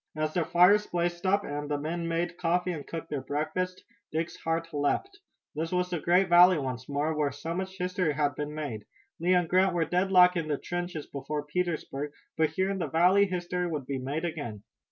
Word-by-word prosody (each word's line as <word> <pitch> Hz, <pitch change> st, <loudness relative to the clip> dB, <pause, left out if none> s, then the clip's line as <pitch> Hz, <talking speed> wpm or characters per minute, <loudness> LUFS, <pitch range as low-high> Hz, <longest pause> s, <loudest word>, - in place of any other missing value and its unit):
As 155 Hz, 0 st, -1 dB
the 175 Hz, -, +1 dB
fires 180 Hz, +6 st, +5 dB
blazed 175 Hz, +1 st, -1 dB
up 200 Hz, +2 st, +3 dB
and 145 Hz, 0 st, -4 dB
the 145 Hz, -, 0 dB
men 165 Hz, +3 st, -3 dB
made 170 Hz, +1 st, -2 dB
coffee 180 Hz, +1 st, +1 dB
and 150 Hz, -5 st, -6 dB
cooked 165 Hz, -1 st, -6 dB
their 145 Hz, -3 st, -2 dB
breakfasts, 155 Hz, +7 st, -3 dB, 0.3 s
Dick's 165 Hz, +2 st, -2 dB
heart 165 Hz, 0 st, -2 dB
leaped. 375 Hz, -, -1 dB, 0.3 s
This 160 Hz, +2 st, -3 dB
was 180 Hz, 0 st, 0 dB
the 175 Hz, -, -1 dB
great 180 Hz, +4 st, +3 dB
valley 175 Hz, 0 st, +7 dB
once 130 Hz, -2 st, -4 dB
more, 145 Hz, +3 st, 0 dB
where 150 Hz, -2 st, +1 dB
so 160 Hz, +5 st, -5 dB
much 190 Hz, +1 st, -4 dB
history 180 Hz, -3 st, 0 dB
had 145 Hz, -1 st, +1 dB
been 150 Hz, +2 st, -5 dB
made. 125 Hz, -9 st, -5 dB, 0.3 s
Lee 180 Hz, +3 st, +3 dB
and 175 Hz, -2 st, +2 dB
Grant 185 Hz, +1 st, +3 dB
were 165 Hz, -2 st, +2 dB
deadlocked 180 Hz, +1 st, +4 dB
in 165 Hz, -2 st, -2 dB
the 150 Hz, -2 st, 0 dB
trenches 175 Hz, -2 st, -4 dB
before 145 Hz, +2 st, -5 dB
Petersburg, 150 Hz, -3 st, -3 dB, 0.2 s
but 160 Hz, -1 st, +2 dB
here 190 Hz, +5 st, 0 dB
in 195 Hz, -, -3 dB
the -, -, -1 dB
valley 185 Hz, +5 st, +4 dB
history 180 Hz, -1 st, -2 dB
would 150 Hz, -5 st, -3 dB
be 135 Hz, 0 st, -3 dB
made 145 Hz, +6 st, -3 dB
again. 145 Hz, -11 st, -5 dB
165 Hz, 205 wpm, -28 LUFS, 150-180 Hz, 0.3 s, valley